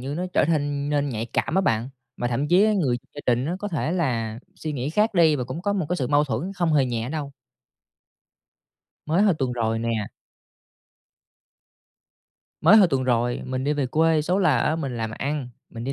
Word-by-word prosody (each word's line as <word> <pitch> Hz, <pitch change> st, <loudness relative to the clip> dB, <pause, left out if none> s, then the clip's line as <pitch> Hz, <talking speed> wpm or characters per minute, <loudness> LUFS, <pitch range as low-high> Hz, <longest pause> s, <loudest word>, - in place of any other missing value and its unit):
như 135 Hz, +3 st, -4 dB
nó 175 Hz, +4 st, -2 dB
trở -, -, +3 dB
thanh 145 Hz, -3 st, -1 dB
nên 145 Hz, -1 st, +1 dB
nhạy 115 Hz, -3 st, -3 dB
cảm 120 Hz, -, -2 dB
á 190 Hz, -, +4 dB
bạn, 115 Hz, -, 0 dB, 0.3 s
mà 120 Hz, -, -2 dB
thậm 135 Hz, +5 st, -1 dB
chí 185 Hz, +6 st, +5 dB
người 140 Hz, -11 st, +1 dB, 0.2 s
gia 145 Hz, -, -7 dB
đình 125 Hz, +1 st, +2 dB
nó 170 Hz, +4 st, -2 dB
có 205 Hz, -, -4 dB
thể 160 Hz, -2 st, -2 dB
là 115 Hz, -10 st, -1 dB, 0.2 s
suy 155 Hz, -, -5 dB
nghĩ 135 Hz, 0 st, -3 dB
khác 210 Hz, +5 st, +1 dB
đi 160 Hz, -4 st, +5 dB
và 125 Hz, -, -3 dB
cũng 130 Hz, +7 st, -6 dB
có 205 Hz, +1 st, 0 dB
một 190 Hz, -6 st, -1 dB
cái 180 Hz, -, 0 dB
sự 130 Hz, -, -1 dB
mâu 145 Hz, 0 st, +3 dB
thuẫn 145 Hz, +8 st, -3 dB
không 175 Hz, -4 st, 0 dB
hề 140 Hz, -3 st, +4 dB
nhẹ 120 Hz, -1 st, -3 dB
đâu. 145 Hz, -2 st, -4 dB, 1.7 s
Mới 165 Hz, +6 st, +2 dB
hơn 200 Hz, -6 st, +3 dB
tuần 130 Hz, -2 st, -1 dB
rồi 115 Hz, -2 st, -1 dB
nè 115 Hz, -, -2 dB, 2.7 s
mới 195 Hz, +7 st, +7 dB
hồi 195 Hz, -4 st, +6 dB
tuần 135 Hz, -4 st, 0 dB
rồi 120 Hz, -1 st, 0 dB
mình 130 Hz, 0 st, -3 dB
đi 145 Hz, -, +1 dB
về 145 Hz, -3 st, -1 dB
quê, 160 Hz, +3 st, +2 dB
số 180 Hz, +5 st, 0 dB
là 150 Hz, -10 st, +3 dB
á 155 Hz, +6 st, +1 dB
mình 135 Hz, -6 st, -4 dB
làm 115 Hz, -1 st, -3 dB
ăn, 140 Hz, +2 st, -3 dB, 0.2 s
mình 115 Hz, 0 st, -7 dB
đi 135 Hz, -, -2 dB
145 Hz, 210 wpm, -24 LUFS, 125-165 Hz, 2.7 s, mới